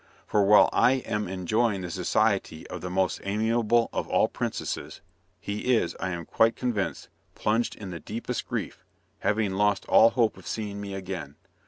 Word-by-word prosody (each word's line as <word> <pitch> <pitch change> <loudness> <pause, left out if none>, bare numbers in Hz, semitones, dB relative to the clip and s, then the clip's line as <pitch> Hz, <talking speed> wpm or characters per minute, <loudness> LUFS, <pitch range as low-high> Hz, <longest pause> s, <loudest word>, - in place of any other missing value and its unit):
For, 105 - +2
while 105 +2 +7
I 125 - +5
am 105 -6 -2
enjoying 100 +3 0
the 90 -1 -5
society 80 0 0
of - - -6
the 90 - -4
most 95 +1 0
amiable 115 +3 +2
of - - -2
all - - +3
princesses, - - -4 0.4
he 105 +6 0
is, 85 - 0
I 95 - -2
am 85 -2 -4
quite 115 +6 +3
convinced, 120 -6 -2 0.3
plunged 115 +2 0
in 100 -3 -8
the 85 - -6
deepest 115 +5 -5
grief, - - -4 0.4
having 105 -1 +1
lost 105 0 +1
all 115 - +6
hope 115 -3 +1
of - - -13
seeing 105 -2 -4
me 100 -1 -5
again. 90 -7 -6
105 Hz, 170 wpm, -27 LUFS, 95-115 Hz, 0.4 s, while